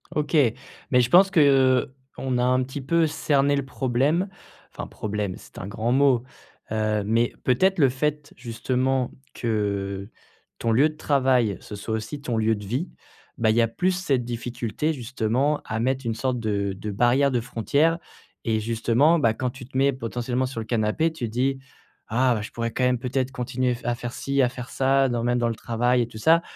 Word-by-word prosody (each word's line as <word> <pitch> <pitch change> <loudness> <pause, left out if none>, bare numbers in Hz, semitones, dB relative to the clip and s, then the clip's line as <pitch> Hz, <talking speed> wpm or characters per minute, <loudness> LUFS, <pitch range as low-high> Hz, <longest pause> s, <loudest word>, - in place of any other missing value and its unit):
OK, 150 +1 -1 0.6
mais 125 -1 +5
je 120 - 0
pense 190 +6 +7
que, 195 -4 +2
heu, 130 -2 +4 0.2
on 130 -2 -1
a 125 - +1
un 130 +1 +3
petit 135 +2 -6
peu 165 +5 +2
cerné 145 -1 +1
le 140 - -1
problème. 135 +8 0 0.5
Enfin - - -6
problème, 105 -3 -3
c'est - - -16
un - - -6
grand 110 +3 -2
mot. 130 -2 +3 0.5
Heu, 110 -1 0
mais 115 +3 +1
peut-être 190 +10 +3
le 140 -3 +5
fait 150 +3 -2
justement 125 +2 -1 0.2
que, 100 -3 -2 0.5
ton 115 - -1
lieu 140 +7 +4
de 155 - -12
travail, 130 - +2
ce 105 - -8
soit 105 +2 -5
aussi 110 +7 -5
ton 125 -4 -2
lieu 110 0 +2
de 105 -1 -8
vie, 130 - -2 0.5
bah 115 -1 +2
il 110 - +3
y 120 - +4
a 115 - +3
plus 180 +10 0
cette 145 -10 0
difficulté 120 +4 -3
justement 130 +2 -1
à 110 - -3
mettre 130 +2 -1
une 115 -1 -1
sorte 125 +2 -1
de 100 -3 -1
de 105 +2 -5
barrière, 120 +7 +3
de 125 - +1
frontière 140 +8 +1 0.5
et 110 -2 +1
justement, 115 +8 +2
bah, 115 -6 +3
quand 125 +3 -2
tu 125 +1 -10
te 130 - -6
mets 140 +1 +4
potentiellement 125 +1 -2
sur 125 -2 -5
le - - -6
canapé, 115 +8 +1
tu 160 -6 -4
te - - -8
dis: 135 +3 0 0.5
«Ah 125 +3 +2
bah 105 - -3
je 105 - -7
pourrais 115 0 -3
quand 130 - -2
même 125 0 +2
peut-être 130 +1 -2
continuer 125 0 -1
f 120 - -12
à 120 - +1
faire 120 0 -6
ci, 140 0 0
à 125 - +3
faire 125 -1 -8
ça, 135 0 +2
dans 120 -1 -1
même 120 0 +1
dans 120 - +1
le 115 - -3
travail 120 +2 +1
et 120 - -1
tout 115 - -11
ça». 165 +9 +4
125 Hz, 210 wpm, -24 LUFS, 115-135 Hz, 0.6 s, pense